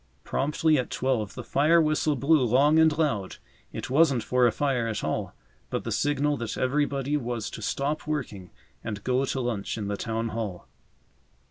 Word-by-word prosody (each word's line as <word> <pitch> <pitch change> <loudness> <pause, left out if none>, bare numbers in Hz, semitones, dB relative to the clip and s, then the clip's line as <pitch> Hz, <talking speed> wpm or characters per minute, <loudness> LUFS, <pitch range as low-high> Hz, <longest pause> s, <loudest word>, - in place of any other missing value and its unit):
Promptly 150 +2 +1
at 125 - -3
twelve 125 -6 -1
the - - -6
fire 155 +4 +3
whistle 155 -1 +2
blew 140 +2 +3
long 140 +6 +4
and 160 -2 +4
loud. 115 -12 0 0.4
It - - -6
wasn't 140 -4 +4
for 125 -1 +3
a - - +2
fire 130 -4 0
at 110 - -3
all, - - -3 0.3
but - - -3
the - - -4
signal 145 0 +1
that 115 -2 -4
everybody 140 +1 0
was 120 -4 -4
to - - -8
stop 145 +7 -2
working 110 - -4 0.3
and 105 -2 -5
go 130 +1 +1
to 135 - -2
lunch 115 -4 -2
in 105 -2 -4
the 100 - -2
Town 115 0 -2
Hall. 105 -6 -5
130 Hz, 175 wpm, -26 LUFS, 115-150 Hz, 0.4 s, long